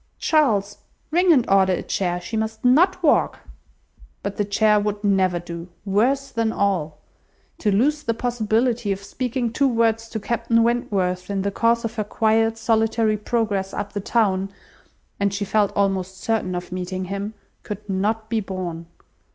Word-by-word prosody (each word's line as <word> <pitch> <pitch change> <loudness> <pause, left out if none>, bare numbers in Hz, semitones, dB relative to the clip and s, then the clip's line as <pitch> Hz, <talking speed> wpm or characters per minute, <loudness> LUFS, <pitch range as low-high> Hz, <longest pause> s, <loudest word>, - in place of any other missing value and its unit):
Charles, 215 -11 +1 0.3
ring 355 +2 +4
and 255 -7 +4
order 190 -1 +4
a - - -2
chair. 175 -2 -1
She 200 +6 -6
must 220 +1 -3
not 350 +9 +4
walk." 305 - +2 0.8
But 200 0 -4
the 205 - +1
chair 210 +1 +3
would 205 0 -2
never 190 -3 +2
do. 170 0 -7 0.2
Worse 260 +8 +1
than 225 -2 0
all! 180 -8 -1 0.6
To 210 - +1
lose 285 +9 +2
the 230 -5 -1
possibility 230 -1 0
of 195 0 -3
speaking 240 +1 -3
two 280 +2 +3
words 225 -2 +1
to 220 - -4
Captain 230 +1 +1
Wentworth 195 -6 0
in 195 -1 -1
the 200 - -1
course 230 +3 +1
of 230 +1 -5
her 215 - +1
quiet, 225 +1 +1
solitary 225 -1 +1
progress 210 -3 -1
up 200 - -4
the 205 - -3
town 195 -3 +1 0.7
(and 200 0 +1
she 200 +1 -2
felt 205 0 +2
almost 190 -2 0
certain 220 -5 -1
of 175 0 -5
meeting 185 +1 -4
him) 200 +3 -4 0.3
could 210 0 -7
not 210 +3 -1
be 225 0 0
borne. 180 -4 -5
210 Hz, 165 wpm, -22 LUFS, 195-230 Hz, 0.8 s, ring